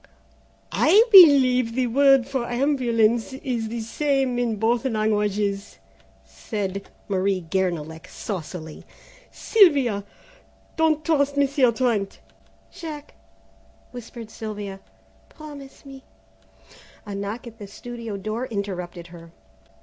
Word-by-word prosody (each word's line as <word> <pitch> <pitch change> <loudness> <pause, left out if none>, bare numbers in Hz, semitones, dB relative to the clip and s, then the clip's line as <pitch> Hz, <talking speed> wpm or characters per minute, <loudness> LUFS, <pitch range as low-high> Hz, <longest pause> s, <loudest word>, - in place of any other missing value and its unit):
"I 400 +8 +5
believe 260 - +7
the 255 -1 +1
word 270 +1 +4
for 265 -3 -3
ambulance 240 -3 +1
is 245 -4 -3
the 230 0 -4
same 270 +1 -1
in 235 -2 0
both 225 +3 0
languages," 210 -4 -1 0.5
said 200 -3 -5 0.2
Marie 190 -2 -1
Guernalec 165 -4 -2
saucily; 165 -6 -7 0.5
"Sylvia, 280 - +3 0.7
don't 310 -2 +1
trust 285 -3 +1
Monsieur 275 -3 +3
Trent." 225 -4 -1 0.5
"Jack," 305 -3 -9 0.8
whispered 235 -2 -10
Sylvia, 205 -3 -7 0.5
"promise 290 -3 -12
me 270 -1 -12 0.5
" - - -24
A 205 - -7
knock 200 +4 -5
at 230 -1 -12
the 205 - -8
studio 230 0 -7
door 215 +5 -4
interrupted 180 -4 -5
her. 170 -1 -13
230 Hz, 105 wpm, -23 LUFS, 200-270 Hz, 0.8 s, believe